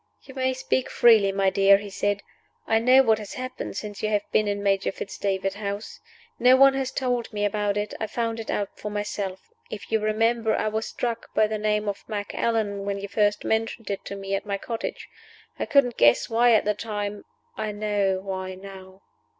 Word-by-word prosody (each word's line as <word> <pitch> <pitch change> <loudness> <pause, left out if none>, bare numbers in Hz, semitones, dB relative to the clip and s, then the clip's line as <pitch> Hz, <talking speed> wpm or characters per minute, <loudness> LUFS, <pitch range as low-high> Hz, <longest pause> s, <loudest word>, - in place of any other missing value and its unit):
"You 265 - -12
may 260 -1 0
speak 260 0 -1
freely, 220 -4 +5
my 195 -1 +2
dear," 195 0 +6
he 200 0 -8
said. 205 +1 -1 0.4
"I 225 0 +3
know 255 +3 +6
what 220 -3 +3
has 210 -2 -8
happened 255 0 -5
since 210 -1 -6
you 215 - 0
have 205 -1 +1
been 215 - +2
in 200 0 -2
Major 195 -1 +1
Fitz 195 - -7
David's 195 -1 -1
house. 200 +1 -5 0.4
No 250 +2 +6
one 275 +1 +7
has 270 -1 -1
told 250 -3 -2
me 205 -1 -1
about 205 0 0
it; 205 0 -2
I 220 - -2
found 230 +1 -2
it 225 - -7
out 200 -1 -1
for 210 - -4
myself. 205 -2 -4 0.2
If 210 - -8
you 220 - +3
remember, 225 +1 +1
I 215 - 0
was 220 +1 -2
struck 230 -1 -4
by 215 - +5
the 215 0 -3
name 210 0 0
of 200 -1 -3
'Macallan,' 205 -1 -1
when 200 0 -2
you 200 - -5
first 205 0 +1
mentioned 225 -1 -1
it 200 - -4
to 200 - -5
me 195 0 -5
at 195 - 0
my 200 -2 -2
cottage. 225 +3 -5 0.5
I - - -2
couldn't 250 -4 +3
guess 120 0 +5
why 235 +1 +5
at 220 - +3
the 210 - +2
time. 205 -1 -4 0.3
I 215 -1 -3
know 205 -2 0
why 190 -1 -5
now." 190 0 -12
210 Hz, 205 wpm, -25 LUFS, 200-225 Hz, 0.5 s, one